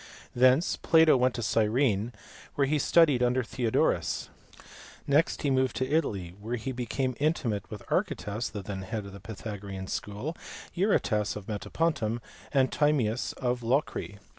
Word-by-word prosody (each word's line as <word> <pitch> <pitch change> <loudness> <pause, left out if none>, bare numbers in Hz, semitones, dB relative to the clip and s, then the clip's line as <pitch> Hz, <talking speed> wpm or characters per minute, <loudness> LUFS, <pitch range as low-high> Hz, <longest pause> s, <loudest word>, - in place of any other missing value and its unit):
Thence 130 +6 +4
Plato 160 -2 +5
went 125 -1 +2
to 120 - -3
Gyrene, 110 0 +2 0.4
where 140 - +3
he 150 +2 +1
studied 145 -4 +4
under 125 +1 +2
Theodorus. 115 -1 0 0.8
Next 145 +4 +2
he 145 - +2
moved 130 0 +1
to 130 - -1
Italy, 100 - -1
where 115 +4 -3
he 125 +3 -4
became 130 +1 -2
intimate 135 - 0
with - - -8
Archytas 105 +4 -1
the 105 -3 -6
then 95 0 -5
head 105 +2 -4
of 100 - -9
the 100 - -9
Pythagorean 100 -2 -7
school, 105 - -4 0.4
Eurytas 125 - +1
of 105 -2 -7
Metapontum, 115 +1 -1 0.3
and 135 -2 +3
Timaeus 130 -6 +1
of 125 -1 -2
Locri. 120 -4 -1
120 Hz, 145 wpm, -28 LUFS, 105-140 Hz, 0.8 s, Plato